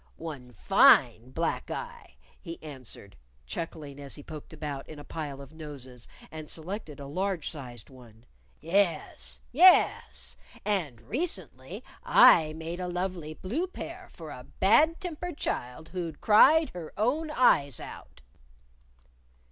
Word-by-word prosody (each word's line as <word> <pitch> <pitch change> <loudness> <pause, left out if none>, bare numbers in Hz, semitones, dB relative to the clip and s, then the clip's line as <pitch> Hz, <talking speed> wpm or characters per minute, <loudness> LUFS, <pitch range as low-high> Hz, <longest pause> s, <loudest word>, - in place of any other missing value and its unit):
"One 145 -7 -8
fine 120 0 +5
black 165 +5 -2
eye," 480 0 -7 0.3
he 165 -2 -7
answered, 130 -9 -10 0.3
chuckling 145 - -6
as 140 -1 -3
he 145 - -10
poked 150 0 -9
about 150 -3 -6
in 155 - -9
a 145 - -9
pile 145 -4 -6
of 140 +2 -13
noses 135 -6 -9 0.2
and 155 -1 -8
selected 160 -3 -5
a 140 - -7
large 180 +2 -2
sized 125 -6 -9
one. 120 -3 -16 0.3
"Yes! 155 - 0
Yes! 60 0 +4 0.3
And 165 - -1
recently 270 - -4 0.2
I 155 -2 +7
made 165 +2 -6
a 180 - -3
lovely 175 -3 -3
blue 270 - -2
pair 365 0 -8
for 160 -3 -10
a 125 -2 -10
bad 300 - +5
tempered 355 -2 -5
child 125 +6 -4
who'd 170 -4 -5
cried 305 +9 +6
her 175 -3 -8
own 280 +10 0
eyes 145 - +3
out." - - -11
160 Hz, 130 wpm, -28 LUFS, 135-195 Hz, 0.3 s, I